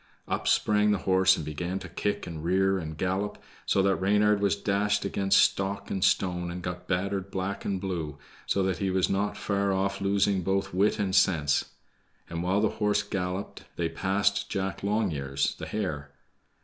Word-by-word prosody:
Up -, -, -2 dB
sprang 105 Hz, 0 st, +3 dB
the 105 Hz, -, +3 dB
horse, 95 Hz, 0 st, +5 dB
and 80 Hz, -, -5 dB
began 85 Hz, +5 st, -3 dB
to -, -, -7 dB
kick 105 Hz, -, -2 dB
and 80 Hz, -2 st, -7 dB
rear 95 Hz, +2 st, +2 dB
and 80 Hz, -2 st, -6 dB
gallop, 95 Hz, +4 st, -1 dB, 0.3 s
so 95 Hz, -, +3 dB
that 95 Hz, 0 st, +2 dB
Reynard 105 Hz, +1 st, +3 dB
was 100 Hz, 0 st, +2 dB
dashed 100 Hz, 0 st, 0 dB
against 95 Hz, 0 st, +2 dB
stock 100 Hz, +1 st, +1 dB
and 95 Hz, -, -1 dB
stone, 90 Hz, -2 st, +1 dB
and 90 Hz, +1 st, -6 dB
got 90 Hz, 0 st, -5 dB
battered 95 Hz, +1 st, -1 dB
black 95 Hz, +1 st, -3 dB
and 95 Hz, -2 st, -1 dB
blue, 85 Hz, -6 st, -4 dB, 0.3 s
so 100 Hz, -, +1 dB
that 95 Hz, -3 st, -1 dB
he 95 Hz, -, 0 dB
was 95 Hz, -1 st, +1 dB
not 100 Hz, +1 st, 0 dB
far 100 Hz, -1 st, 0 dB
off 95 Hz, +1 st, -1 dB
losing 100 Hz, -1 st, +2 dB
both 95 Hz, +2 st, -1 dB
wit 100 Hz, +3 st, +2 dB
and 95 Hz, -2 st, -1 dB
sense. 75 Hz, -7 st, +3 dB, 0.7 s
And 85 Hz, 0 st, -3 dB
while 95 Hz, +3 st, +1 dB
the 110 Hz, -, +3 dB
horse 105 Hz, 0 st, +2 dB
galloped, 95 Hz, -1 st, -4 dB
they 85 Hz, -1 st, -1 dB
passed 100 Hz, +4 st, 0 dB
Jack 95 Hz, 0 st, -3 dB
Longears, 80 Hz, -10 st, 0 dB
the -, -, -5 dB
hare. 80 Hz, -9 st, -3 dB
95 Hz, 180 wpm, -28 LUFS, 90-100 Hz, 0.7 s, horse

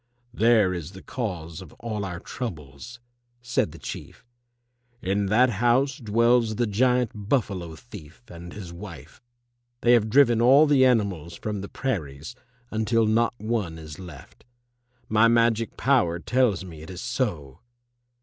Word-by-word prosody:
"There 110 Hz, -4 st, +4 dB
is 85 Hz, 0 st, -6 dB
the 95 Hz, -, -12 dB
cause 90 Hz, -9 st, -5 dB
of 95 Hz, -, -12 dB
all 110 Hz, -3 st, -5 dB
our 90 Hz, -3 st, -5 dB
troubles," 90 Hz, -, -7 dB, 0.4 s
said 125 Hz, 0 st, -1 dB
the -, -, -12 dB
Chief. -, -, -9 dB, 0.7 s
"In 100 Hz, 0 st, -1 dB
that 120 Hz, +5 st, +4 dB
house 120 Hz, +6 st, +2 dB
dwells 115 Hz, 0 st, +2 dB
the 120 Hz, -, +1 dB
giant 125 Hz, +2 st, +2 dB
Buffalo 100 Hz, -, -2 dB
thief 95 Hz, -2 st, -13 dB
and 85 Hz, 0 st, -10 dB
his 90 Hz, -4 st, -9 dB
wife. 85 Hz, -1 st, -11 dB, 0.6 s
They 120 Hz, -, +4 dB
have 110 Hz, -2 st, +3 dB
driven 120 Hz, -2 st, +4 dB
all 135 Hz, +6 st, +7 dB
the 140 Hz, -3 st, +4 dB
animals 95 Hz, -9 st, 0 dB
from 105 Hz, +2 st, -4 dB
the 100 Hz, -, -7 dB
prairies 80 Hz, -, -4 dB, 0.4 s
until 110 Hz, +1 st, +1 dB
not 115 Hz, +2 st, +2 dB
one 105 Hz, -7 st, -2 dB
is 80 Hz, -1 st, -10 dB
left. 85 Hz, -7 st, -12 dB, 0.6 s
My 110 Hz, +1 st, +4 dB
magic 115 Hz, -1 st, +2 dB
power 120 Hz, -12 st, +2 dB
tells 110 Hz, -1 st, +1 dB
me 80 Hz, -4 st, -10 dB
it 80 Hz, -, -11 dB
is 90 Hz, -1 st, -7 dB
so!" 105 Hz, -, -3 dB
110 Hz, 145 wpm, -25 LUFS, 90-120 Hz, 0.7 s, all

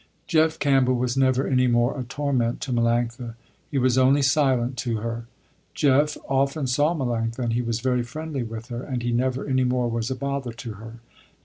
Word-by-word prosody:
Jeff 160 Hz, 0 st, +2 dB
Campbell 135 Hz, -3 st, +3 dB
was 125 Hz, 0 st, -1 dB
never 130 Hz, 0 st, +2 dB
any 130 Hz, -1 st, +2 dB
more 120 Hz, +1 st, +2 dB
a 135 Hz, -, -4 dB
torment 125 Hz, -2 st, -1 dB
to 130 Hz, -, -3 dB
Melanctha, 120 Hz, 0 st, 0 dB, 0.3 s
he 145 Hz, -, -2 dB
was 130 Hz, -1 st, +3 dB
only 135 Hz, +2 st, +4 dB
silent 130 Hz, -2 st, +2 dB
to 120 Hz, -3 st, -1 dB
her. 115 Hz, +1 st, -5 dB, 0.5 s
Jeff 145 Hz, +1 st, +3 dB
often 135 Hz, +2 st, 0 dB
saw 145 Hz, +6 st, +2 dB
Melanctha 115 Hz, -5 st, -2 dB
and 120 Hz, -3 st, -1 dB
he 120 Hz, -, +1 dB
was 115 Hz, -1 st, -2 dB
very 125 Hz, -1 st, +1 dB
friendly 145 Hz, +3 st, -5 dB
with 115 Hz, 0 st, -7 dB
her 120 Hz, 0 st, -4 dB
and 130 Hz, -3 st, -4 dB
he 120 Hz, -, -1 dB
never 130 Hz, +2 st, 0 dB
any 130 Hz, -2 st, +1 dB
more 125 Hz, -1 st, +1 dB
was 115 Hz, 0 st, -2 dB
a 130 Hz, -, -2 dB
bother 140 Hz, -2 st, -3 dB
to 115 Hz, -1 st, -7 dB
her. 115 Hz, +2 st, -10 dB
125 Hz, 195 wpm, -24 LUFS, 120-135 Hz, 0.5 s, only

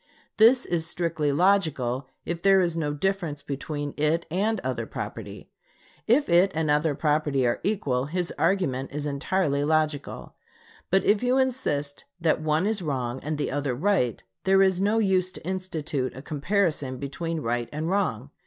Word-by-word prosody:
This 240 Hz, +4 st, +6 dB
is 165 Hz, -2 st, 0 dB
strictly 165 Hz, -4 st, 0 dB
logical 145 Hz, -7 st, +1 dB, 0.2 s
if 170 Hz, -1 st, -3 dB
there 195 Hz, 0 st, +5 dB
is 175 Hz, -3 st, +1 dB
no 155 Hz, -3 st, -1 dB
difference 160 Hz, -2 st, -2 dB
between 145 Hz, +1 st, -4 dB
it 155 Hz, +3 st, +1 dB
and 210 Hz, +5 st, 0 dB
other -, -, -3 dB
property. -, -, -7 dB, 0.6 s
If 270 Hz, +6 st, +4 dB
it 180 Hz, +3 st, +4 dB
and 155 Hz, -2 st, +1 dB
other 150 Hz, 0 st, +2 dB
property 150 Hz, -3 st, +1 dB
are 120 Hz, -, +1 dB
equal, 145 Hz, -11 st, 0 dB
his 175 Hz, +4 st, -3 dB
argument 135 Hz, -9 st, 0 dB
is 145 Hz, +1 st, -4 dB
entirely 145 Hz, +1 st, 0 dB
logical. 155 Hz, -1 st, -1 dB, 0.6 s
But 190 Hz, +1 st, +3 dB
if 205 Hz, 0 st, +3 dB
you 250 Hz, +1 st, +2 dB
insist 195 Hz, -, -1 dB
that 160 Hz, -2 st, +1 dB
one 155 Hz, +3 st, +1 dB
is 215 Hz, -1 st, 0 dB
wrong 130 Hz, -5 st, -2 dB
and 155 Hz, +2 st, -3 dB
the 145 Hz, -, -2 dB
other 140 Hz, -2 st, -1 dB
right, 150 Hz, -, +1 dB, 0.2 s
there 195 Hz, 0 st, +5 dB
is 190 Hz, -1 st, +2 dB
no 205 Hz, +3 st, +2 dB
use 190 Hz, -4 st, +2 dB
to -, -, -11 dB
institute 160 Hz, -9 st, -3 dB
a 130 Hz, -, -8 dB
comparison 150 Hz, -4 st, 0 dB
between 160 Hz, +4 st, -4 dB
right 120 Hz, -1 st, -2 dB
and 155 Hz, +2 st, -3 dB
wrong. 160 Hz, -, -1 dB
160 Hz, 160 wpm, -26 LUFS, 145-190 Hz, 0.6 s, This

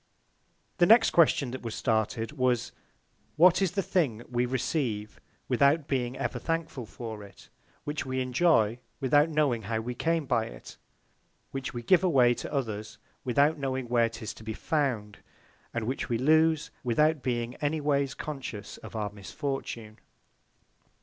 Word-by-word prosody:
The 175 Hz, -, +6 dB
next 225 Hz, +1 st, +6 dB
Question 150 Hz, -6 st, +4 dB
that 130 Hz, -, -6 dB
was 115 Hz, -2 st, -5 dB
started, 110 Hz, 0 st, 0 dB
was, 125 Hz, -2 st, 0 dB, 0.6 s
What 180 Hz, +3 st, +6 dB
is 185 Hz, -3 st, +1 dB
the 195 Hz, -, 0 dB
Thing 130 Hz, -, 0 dB
we 125 Hz, 0 st, 0 dB
receive, 125 Hz, -5 st, -2 dB, 0.3 s
without 140 Hz, +4 st, +3 dB
being 125 Hz, -2 st, -1 dB
ever -, -, -2 dB
thankful 165 Hz, -7 st, -3 dB
for 110 Hz, -2 st, -7 dB
it; 100 Hz, -2 st, -15 dB, 0.3 s
which 150 Hz, +1 st, -3 dB
we 130 Hz, 0 st, -3 dB
enjoy, 125 Hz, -4 st, +2 dB, 0.2 s
without 145 Hz, +4 st, +4 dB
knowing 145 Hz, -7 st, +1 dB
how 110 Hz, +2 st, -2 dB
we 125 Hz, +2 st, -4 dB
came 165 Hz, +3 st, 0 dB
by 120 Hz, -4 st, +1 dB
it; -, -, -11 dB, 0.8 s
which 135 Hz, -1 st, -5 dB
we 120 Hz, -, -4 dB
give 180 Hz, +7 st, +4 dB
away 130 Hz, -9 st, +5 dB
to -, -, -6 dB
others, 110 Hz, -6 st, -3 dB, 0.3 s
without 140 Hz, +5 st, +2 dB
knowing 130 Hz, -3 st, -3 dB
where 120 Hz, -1 st, +3 dB
'tis 110 Hz, -1 st, -7 dB
to -, -, -13 dB
be 110 Hz, 0 st, -5 dB
found; 120 Hz, -11 st, -1 dB, 0.5 s
and 115 Hz, -2 st, -3 dB
which 130 Hz, +4 st, -3 dB
we 115 Hz, -, +1 dB
lose, 155 Hz, +4 st, +3 dB
without 150 Hz, +5 st, +2 dB
being 120 Hz, -1 st, -2 dB
any 150 Hz, +1 st, -1 dB
ways 140 Hz, -2 st, 0 dB
conscious 120 Hz, -8 st, -6 dB
of -, -, -11 dB
our 105 Hz, -2 st, -2 dB
Misfortune? 110 Hz, 0 st, -5 dB
130 Hz, 155 wpm, -28 LUFS, 115-150 Hz, 0.8 s, The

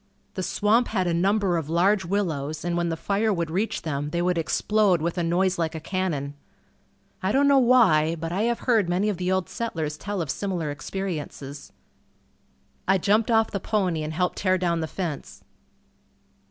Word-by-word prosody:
The 190 Hz, -, -4 dB
swamp 215 Hz, +6 st, +2 dB
had 190 Hz, -4 st, 0 dB
a 175 Hz, -, 0 dB
number 190 Hz, +1 st, +2 dB
of 160 Hz, -2 st, -4 dB
large 190 Hz, +3 st, +2 dB
willows 160 Hz, -6 st, -2 dB
and 175 Hz, -1 st, -1 dB
when 170 Hz, 0 st, 0 dB
the 165 Hz, -, -2 dB
fire 205 Hz, +5 st, 0 dB
would 170 Hz, -4 st, -2 dB
reach 200 Hz, +6 st, -1 dB
them 145 Hz, -2 st, -3 dB
they 170 Hz, -, -2 dB
would 180 Hz, 0 st, +1 dB
explode 200 Hz, +2 st, +2 dB
with 165 Hz, +2 st, -2 dB
a 180 Hz, -, -1 dB
noise 180 Hz, +2 st, +1 dB
like 165 Hz, -1 st, -1 dB
a -, -, -3 dB
cannon. 155 Hz, -5 st, -2 dB, 0.9 s
I 190 Hz, +1 st, 0 dB
don't 280 Hz, +4 st, +3 dB
know 280 Hz, -1 st, +6 dB
why, 220 Hz, -11 st, +4 dB
but 165 Hz, 0 st, -5 dB
I 190 Hz, +4 st, -1 dB
have 235 Hz, -, -2 dB
heard 225 Hz, -8 st, +2 dB
many 185 Hz, +4 st, +1 dB
of 205 Hz, -, -2 dB
the 180 Hz, +1 st, -1 dB
old 190 Hz, -2 st, 0 dB
settlers 160 Hz, -10 st, -3 dB
tell 205 Hz, -1 st, -4 dB
of 160 Hz, -6 st, -2 dB
similar 180 Hz, -7 st, -3 dB
experiences. 150 Hz, -3 st, -6 dB, 1.2 s
I 190 Hz, +1 st, +4 dB
jumped 210 Hz, +5 st, +2 dB
off 225 Hz, -1 st, +3 dB
the 200 Hz, -, -2 dB
pony 185 Hz, -5 st, 0 dB
and 155 Hz, 0 st, -3 dB
helped 180 Hz, +2 st, -1 dB
tear 185 Hz, -1 st, +2 dB
down 170 Hz, -2 st, 0 dB
the 160 Hz, -, -2 dB
fence. 145 Hz, -, -5 dB
180 Hz, 190 wpm, -25 LUFS, 160-200 Hz, 1.2 s, know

